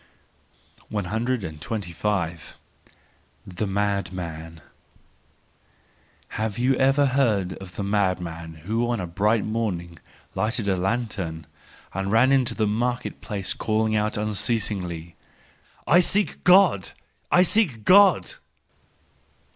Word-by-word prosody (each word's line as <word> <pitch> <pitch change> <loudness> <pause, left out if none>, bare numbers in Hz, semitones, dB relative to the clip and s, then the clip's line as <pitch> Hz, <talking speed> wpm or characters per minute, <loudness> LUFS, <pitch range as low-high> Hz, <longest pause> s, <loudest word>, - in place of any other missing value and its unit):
125. 100 -4 -3 0.9
The 95 +3 -4
Madman 90 -5 -3 0.8
.— - - -36
Have 110 -2 -2
you 125 +2 +2
ever 135 +2 +3
heard 115 -9 +1
of 95 -2 -11
the 100 - -3
madman 90 -5 -2
who 115 +4 0
on 120 -2 -1
a 90 - -3
bright 105 +6 +1
morning 90 -7 -3 0.3
lighted 110 0 -1
a 95 - +2
lantern 95 -5 -2 0.5
and 95 +1 -2
ran 130 +4 +4
to - - -4
the 110 - +1
market 120 +4 -2
place 100 -3 -2
calling 110 0 0
out 105 0 0
unceasingly: 100 -6 -2 0.4
" - - -33 0.3
I 175 - +5
seek 200 +3 0
God! 180 - +4 0.4
I 180 - +6
seek 165 - +1
God 200 - +5
105 Hz, 105 wpm, -24 LUFS, 90-120 Hz, 0.9 s, I